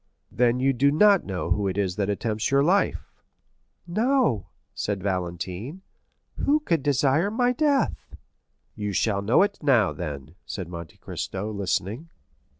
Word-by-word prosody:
"Then 120 0 +2
you 135 +1 +2
do 135 +3 +3
not 200 +6 +4
know 90 -3 -4
who 100 +2 +1
it 95 0 -2
is 95 -3 0
that 100 -1 0
attempts 110 +1 -1
your 140 0 +3
life?" 190 +6 +1 0.7
50073m 170 - -9
"No," 235 - +2 0.3
said 100 -3 -3
Valentine; 95 - -4 0.5
"who 295 +2 +2
could 165 - 0
desire 145 +5 +2
my 245 +3 +1
death?" 280 -1 0 0.6
"You 105 -1 -4
shall 100 +1 +1
know 110 - +4
it 200 0 -2
now, 125 - +3
then," 75 -4 -6
said 95 -5 -6
Monte 85 -3 -8
Cristo, 100 +3 -5
listening. 100 - -2
115 Hz, 150 wpm, -25 LUFS, -, 0.7 s, not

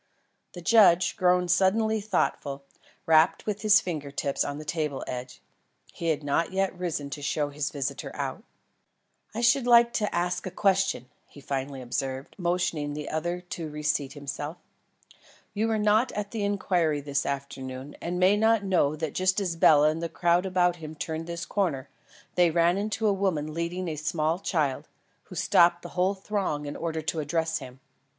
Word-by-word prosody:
The 175 - -8
judge, 185 -5 +5
grown 180 -1 +3
suddenly 210 +5 +2
thoughtful, 145 -8 -1 0.4
rapped 160 0 +4
with 210 -1 -3
his 215 -1 +6
finger 155 -5 -4
tips 140 0 -1
on 145 - -4
the 155 - -8
table 150 -3 -2
edge. 125 0 -7 0.5
He 170 - -4
had 155 -2 0
not 145 +4 0
yet 190 0 0
risen 165 -6 -3
to 145 - -6
show 145 0 -1
his 145 0 -3
visitor 140 -3 -4
out. - - -4 0.9
"I 230 - -2
should 240 +1 +3
like 235 -1 +6
to 210 -2 0
ask 175 +1 -1
a - - -2
question," 190 - +1 0.2
he - - -15
finally 135 -1 -4
observed, 130 +2 -4
motioning 170 -4 -1
the 150 -1 -5
other 175 +3 -2
to 170 -3 -6
re 150 0 -7
seat 145 -2 0
himself. 145 +3 -6 1.0
"You 215 +2 0
were 220 -1 +1
not 215 +4 +3
at 205 -1 -4
the 220 -3 -3
inquiry 180 -6 +1
this 140 0 -1
afternoon, 135 -1 -5
and 175 +1 -3
may 185 +3 +5
not 220 0 +3
know 170 -6 +2
that 160 0 -4
just 185 +1 +1
as 180 -4 -2
Bela 150 -2 +6
and 160 +1 -5
the 170 - -3
crowd 175 +2 +2
about 180 -1 +2
him 155 -1 -8
turned 160 +1 -4
this 170 0 -5
corner, 150 -10 -1 0.4
they 175 -1 +4
ran 170 +2 +3
into 215 +2 -2
a 205 - +4
woman 170 -6 -1
leading 170 +3 -3
a 160 - -3
small 155 +2 0
child, 155 -9 -1 0.4
who - - -11
stopped 175 0 +4
the - - -7
whole 185 +2 +1
throng 190 -7 -2
in 145 - -5
order 160 -1 -3
to 160 - -2
address 160 +2 -1
him. 130 -2 -11
170 Hz, 180 wpm, -27 LUFS, 145-190 Hz, 1.0 s, his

